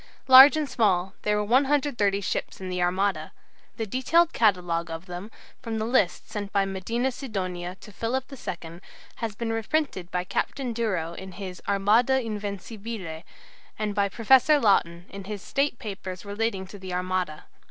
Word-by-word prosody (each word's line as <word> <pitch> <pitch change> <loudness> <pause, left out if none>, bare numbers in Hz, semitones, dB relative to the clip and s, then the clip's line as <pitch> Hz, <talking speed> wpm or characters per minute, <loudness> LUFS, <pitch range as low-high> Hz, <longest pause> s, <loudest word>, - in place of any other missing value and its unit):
Large 265 +3 +10
and 305 -2 -1
small, 190 -6 +1
there 210 0 +1
were 210 - +1
130 250 -4 +2
ships 190 - -3
in 190 -1 -6
the 180 0 -2
Armada. 180 -2 0 0.5
The 225 - -2
detailed 265 - +2
catalogue 175 -6 +1
of 165 +2 -6
them, 180 +3 -7 0.3
from 230 -3 -4
the 220 - -1
list 225 -7 +1
sent 210 -2 -5
by 200 -1 +2
Medina 230 +7 -2
Sidonia 185 -8 -4
to 210 - -12
Philip 235 +5 -2
II, 170 -9 -7 0.4
has 225 -3 -4
been 225 +1 -2
reprinted 225 - -1
by 180 0 -1
Captain 245 +6 -2
Duro 190 -8 -1
in 190 +1 -9
his 185 -1 -7
"Armada 215 +7 +3
Invencibile," 205 -4 -5 0.6
and 215 -1 -2
by 200 0 +1
Professor 265 +7 +5
Laughton 175 -6 +2
in 195 -1 -9
his 205 -1 -6
"State 275 -2 0
Papers 190 -3 -7
relating 205 -1 -2
to 195 +2 -11
the 185 -1 -5
Armada." 180 -3 -2
205 Hz, 160 wpm, -26 LUFS, 185-235 Hz, 0.6 s, Large